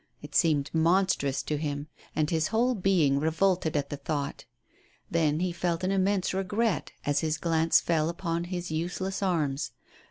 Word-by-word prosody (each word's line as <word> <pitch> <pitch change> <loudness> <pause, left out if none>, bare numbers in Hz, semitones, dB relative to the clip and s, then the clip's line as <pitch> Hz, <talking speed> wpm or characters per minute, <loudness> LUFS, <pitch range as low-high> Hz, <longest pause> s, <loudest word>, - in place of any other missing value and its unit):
It 145 0 -10
seemed 150 -3 +2
monstrous 165 -5 +2
to 150 - -2
him, 145 -1 -3 0.3
and 155 -1 +2
his 160 0 +1
ivhole 235 +4 +2
being 160 -8 +3
revolted 160 +1 +1
at 140 -1 -2
the 145 - -3
thought. 140 0 -3 0.7
Then 160 -1 +2
he 185 -1 0
felt 170 0 -2
an 185 - +1
immense 195 -1 +1
regret 200 +3 0
as 145 0 +2
his 160 0 0
glance 165 -1 +3
fell 160 -2 +1
upon 170 -1 -2
his 175 -1 -4
use 170 +3 -2
less 190 +1 -3
arms. 155 -7 0
165 Hz, 165 wpm, -28 LUFS, 150-185 Hz, 0.7 s, being